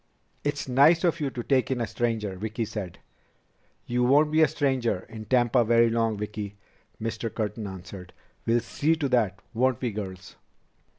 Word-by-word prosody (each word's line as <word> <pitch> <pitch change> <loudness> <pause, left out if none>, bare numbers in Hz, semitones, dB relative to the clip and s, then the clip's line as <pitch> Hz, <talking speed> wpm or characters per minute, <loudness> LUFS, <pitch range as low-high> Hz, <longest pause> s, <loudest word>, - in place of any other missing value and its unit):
"It's 145 -1 -2
nice 145 +7 +5
of 170 -1 +2
you 145 -3 -1
to 125 -2 -5
take 130 -1 +2
in 130 -2 -1
a 120 - 0
stranger," 110 -3 -2
Vicki 110 +4 -3
said. 105 -5 -6 0.9
"You 125 +1 0
won't 145 +4 +4
be 160 +1 +4
a 155 - +7
stranger 130 -9 0
in 110 -1 -9
Tampa 120 0 +3
very 115 0 +4
long, 115 -2 +1
Vicki," 105 -1 -5 0.4
Mr. 115 0 -3
Curtin 105 -1 -3
answered. 95 -1 -9 0.4
"We'll 115 +1 +3
see 145 +7 +1
to 150 -3 -1
that, 110 -6 +1
won't 125 +1 +2
we, 125 -3 -1
girls?" 95 -3 -7
115 Hz, 170 wpm, -26 LUFS, 105-130 Hz, 0.9 s, a